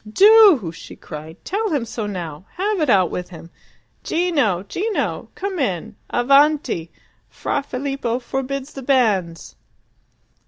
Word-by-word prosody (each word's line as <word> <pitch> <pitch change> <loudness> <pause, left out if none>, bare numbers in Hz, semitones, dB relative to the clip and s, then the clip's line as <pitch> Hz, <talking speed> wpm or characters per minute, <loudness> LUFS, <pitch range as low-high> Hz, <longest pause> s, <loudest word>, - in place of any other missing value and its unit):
"Do," 395 - +6
she - - -11
cried. 155 +1 -9
"Tell 430 +3 -1
him 285 -8 -1
so 220 -2 -4
now. 175 -4 -6
Have 395 0 -1
it 300 - +1
out 185 -6 +4
with 180 0 -5
him. 170 -1 -12 0.5
Gino! 285 - +1
Gino! 410 - -3
Come 385 -2 -4
in! 220 - -2
Avanti! 275 - +2 0.4
Fra 285 - -2
Filippo 270 -3 -3
forbids 270 +2 -4
the 270 - -7
banns!" 210 -11 0
255 Hz, 125 wpm, -21 LUFS, 185-305 Hz, 0.5 s, Do